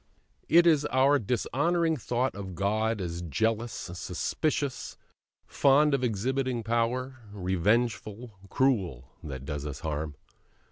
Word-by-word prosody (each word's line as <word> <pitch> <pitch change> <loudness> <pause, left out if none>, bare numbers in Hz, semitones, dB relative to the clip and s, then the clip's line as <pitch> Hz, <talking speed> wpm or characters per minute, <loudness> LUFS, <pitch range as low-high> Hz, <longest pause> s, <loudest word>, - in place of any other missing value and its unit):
It 170 +1 +6
is 155 -4 +5
our 140 +2 +4
dishonouring 160 - 0
thought 125 0 -1
of 95 -3 -7
God 110 +3 0
as 85 -2 -4
jealous, 110 - -1
suspicious, 135 - -3 0.5
fond 145 +2 +4
of 135 -2 +1
exhibiting 125 +2 -1
power, 120 +3 -1
revengeful, 105 +4 0 0.2
cruel, 95 - +1 0.2
that 70 -3 -7
does 75 0 -4
us 70 +1 -7
harm. 75 -2 -3
115 Hz, 110 wpm, -28 LUFS, 95-130 Hz, 0.5 s, It